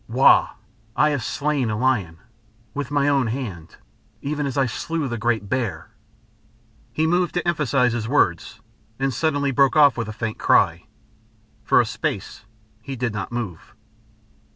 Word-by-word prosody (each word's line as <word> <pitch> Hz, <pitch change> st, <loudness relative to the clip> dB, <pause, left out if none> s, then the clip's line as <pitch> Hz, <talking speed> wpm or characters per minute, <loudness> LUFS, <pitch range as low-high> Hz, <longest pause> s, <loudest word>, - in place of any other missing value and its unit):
"Wau! 125 Hz, +4 st, +4 dB, 0.4 s
I 150 Hz, 0 st, +3 dB
have 140 Hz, -5 st, -2 dB
slain 140 Hz, -2 st, -1 dB
a 105 Hz, -, -2 dB
lion. 105 Hz, -10 st, 0 dB, 0.6 s
With 145 Hz, -3 st, -4 dB
my 145 Hz, -1 st, +1 dB
own 140 Hz, -4 st, +2 dB
hand. 105 Hz, -9 st, -5 dB, 0.5 s
Even 145 Hz, 0 st, -2 dB
as 135 Hz, -, -4 dB
I 135 Hz, -, +3 dB
slew 155 Hz, +5 st, -3 dB
the 120 Hz, -2 st, -4 dB
great 115 Hz, -3 st, 0 dB
bear." 100 Hz, -, -3 dB, 1.0 s
He 155 Hz, +6 st, 0 dB
moved 175 Hz, +2 st, +1 dB
to 175 Hz, 0 st, -1 dB
emphasise 135 Hz, -7 st, +1 dB
his 115 Hz, -2 st, -3 dB
words, 90 Hz, -, 0 dB, 0.4 s
and 135 Hz, 0 st, -1 dB
suddenly 145 Hz, -1 st, 0 dB
broke 135 Hz, +2 st, +3 dB
off 145 Hz, -4 st, +6 dB
with 115 Hz, -3 st, -2 dB
a -, -, -5 dB
faint 110 Hz, 0 st, -4 dB
cry. -, -, +2 dB, 0.8 s
For -, -, +4 dB
a -, -, +3 dB
space -, -, -4 dB, 0.4 s
he 135 Hz, +4 st, -6 dB
did 125 Hz, -3 st, -2 dB
not 105 Hz, 0 st, -5 dB
move. 110 Hz, -9 st, -6 dB
130 Hz, 155 wpm, -22 LUFS, 110-145 Hz, 1.0 s, off